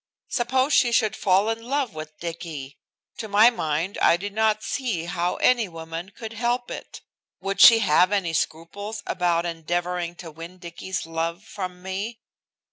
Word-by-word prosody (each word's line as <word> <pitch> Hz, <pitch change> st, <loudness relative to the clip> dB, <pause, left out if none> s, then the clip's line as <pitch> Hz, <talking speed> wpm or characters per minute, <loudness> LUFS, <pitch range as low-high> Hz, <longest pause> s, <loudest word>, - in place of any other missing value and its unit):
Suppose 260 Hz, +3 st, +1 dB
she 240 Hz, -, +5 dB
should 220 Hz, -3 st, +2 dB
fall 195 Hz, +1 st, +3 dB
in 225 Hz, 0 st, -4 dB
love 265 Hz, -1 st, -1 dB
with 155 Hz, 0 st, -8 dB
Dicky! 160 Hz, -5 st, -6 dB, 0.4 s
To 220 Hz, -, -5 dB
my 215 Hz, +4 st, +6 dB
mind 165 Hz, -2 st, -2 dB
I 170 Hz, -, +5 dB
did 200 Hz, +3 st, -6 dB
not 215 Hz, 0 st, +2 dB
see 225 Hz, -12 st, -2 dB
how 175 Hz, 0 st, -1 dB
any 240 Hz, -4 st, +3 dB
woman 165 Hz, +2 st, -7 dB
could 220 Hz, +2 st, -8 dB
help 240 Hz, +2 st, -1 dB
it. -, -, -8 dB, 0.4 s
Would 195 Hz, 0 st, -2 dB
she 230 Hz, -, +11 dB
have 180 Hz, +3 st, +4 dB
any 190 Hz, -5 st, 0 dB
scruples 200 Hz, +7 st, -3 dB
about 175 Hz, -2 st, +1 dB
endeavoring 175 Hz, +1 st, -2 dB
to 170 Hz, -2 st, -9 dB
win 165 Hz, +4 st, -10 dB
Dicky's 180 Hz, +1 st, -5 dB
love 165 Hz, +3 st, -3 dB
from 185 Hz, -4 st, -7 dB
me? 200 Hz, +5 st, -4 dB
185 Hz, 160 wpm, -24 LUFS, 170-220 Hz, 0.4 s, she